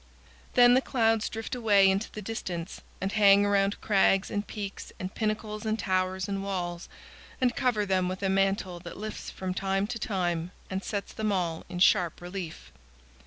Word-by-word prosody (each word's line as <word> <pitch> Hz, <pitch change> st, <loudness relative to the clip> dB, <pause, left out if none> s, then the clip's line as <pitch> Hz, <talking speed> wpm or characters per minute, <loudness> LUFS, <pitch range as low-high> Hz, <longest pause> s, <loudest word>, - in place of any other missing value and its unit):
Then 245 Hz, 0 st, +7 dB
the 255 Hz, -, +5 dB
clouds 225 Hz, -4 st, +1 dB
drift 225 Hz, +2 st, -5 dB
away 210 Hz, -5 st, +4 dB
into 195 Hz, +3 st, +1 dB
the 215 Hz, -, -7 dB
distance, 185 Hz, -5 st, -5 dB, 0.2 s
and 195 Hz, +1 st, -2 dB
hang 200 Hz, -1 st, +6 dB
around 200 Hz, 0 st, +2 dB
crags 195 Hz, -2 st, +3 dB
and 205 Hz, 0 st, -2 dB
peaks 200 Hz, -2 st, -6 dB
and 185 Hz, +1 st, -5 dB
pinnacles 215 Hz, 0 st, -2 dB
and 220 Hz, 0 st, 0 dB
towers 185 Hz, -2 st, 0 dB
and 195 Hz, -1 st, -3 dB
walls, 175 Hz, -3 st, -4 dB, 0.5 s
and 250 Hz, -2 st, +2 dB
cover 230 Hz, -5 st, +1 dB
them 185 Hz, -2 st, +1 dB
with 185 Hz, +2 st, -5 dB
a -, -, +2 dB
mantle 195 Hz, -2 st, +1 dB
that 170 Hz, -1 st, -9 dB
lifts 215 Hz, +2 st, -6 dB
from 185 Hz, -1 st, -4 dB
time 195 Hz, +1 st, 0 dB
to 230 Hz, +2 st, -5 dB
time 175 Hz, -4 st, -1 dB, 0.2 s
and 190 Hz, +1 st, -2 dB
sets 200 Hz, -2 st, -4 dB
them 215 Hz, -1 st, -1 dB
all 175 Hz, -4 st, -1 dB
in 180 Hz, -, -5 dB
sharp 180 Hz, -1 st, +3 dB
relief. 175 Hz, -2 st, -7 dB
195 Hz, 175 wpm, -28 LUFS, 185-215 Hz, 0.5 s, Then